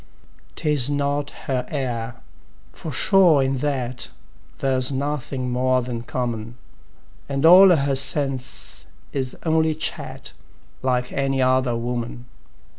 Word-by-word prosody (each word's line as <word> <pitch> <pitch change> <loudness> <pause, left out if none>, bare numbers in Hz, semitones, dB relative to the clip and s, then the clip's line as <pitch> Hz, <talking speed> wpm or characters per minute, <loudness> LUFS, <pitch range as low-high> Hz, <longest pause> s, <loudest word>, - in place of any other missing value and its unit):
'Tis 145 -4 +2
not 145 0 -1 0.2
her 130 -2 -1
air, 120 -5 -4 0.5
for 160 - -7
sure 170 - +4
in 135 0 0
that 125 -3 -2 0.5
There's 130 -1 +2
nothing 135 -2 -3
more 130 0 +1
than 120 -1 -4
common; 120 -1 -4 0.7
And 140 +2 0
all 185 +3 +9
her 140 -5 +2
sense 130 - 0 0.3
is 130 -2 -3
only 160 -1 +2
chat 155 - -4 0.5
Like 125 -1 0
any 135 -1 -1
other 130 -1 +2
woman. 120 +1 -4
130 Hz, 115 wpm, -22 LUFS, 125-145 Hz, 0.7 s, all